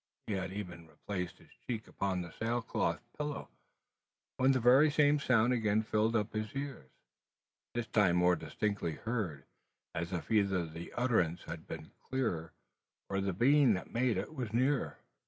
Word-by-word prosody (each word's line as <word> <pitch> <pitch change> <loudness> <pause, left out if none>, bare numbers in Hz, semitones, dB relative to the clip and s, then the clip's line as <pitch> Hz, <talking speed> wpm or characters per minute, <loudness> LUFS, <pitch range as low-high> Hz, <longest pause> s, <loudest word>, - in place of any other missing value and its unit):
He 105 - -2
had 95 -1 -2
even 90 -4 -6
replaced 90 +3 -5
his - - -20 0.2
cheek 115 -3 -3
upon 95 -2 -1
the 85 - -9
sail 115 +4 -1
cloth - - -1
pillow, 150 -1 -4 0.9
when 130 +1 +5
the 130 - +3
very 130 +6 +6
same 145 0 +4
sound 125 -2 +3
again 110 -2 +2
fill 110 0 +2
upon 110 0 -1
his 110 +4 -8
ear, 135 - -5 0.9
this 120 -1 0
time 100 -6 +3
more 90 0 +5
distinctly 100 -1 -2
heard, 105 - -3 0.5
as 85 +1 -3
if 90 +4 -4
either 100 -5 +3
the 80 +1 -8
utterance 90 -9 +1
had 80 -1 -7
been 80 -1 -7
clearer 110 -12 -2 0.6
or 100 0 0
the 95 0 0
being 130 +4 +5
that 90 - -7
made 120 -3 +2
it 95 - -3
was 125 -8 -4
nearer! 125 - +1
105 Hz, 165 wpm, -33 LUFS, 90-125 Hz, 0.9 s, very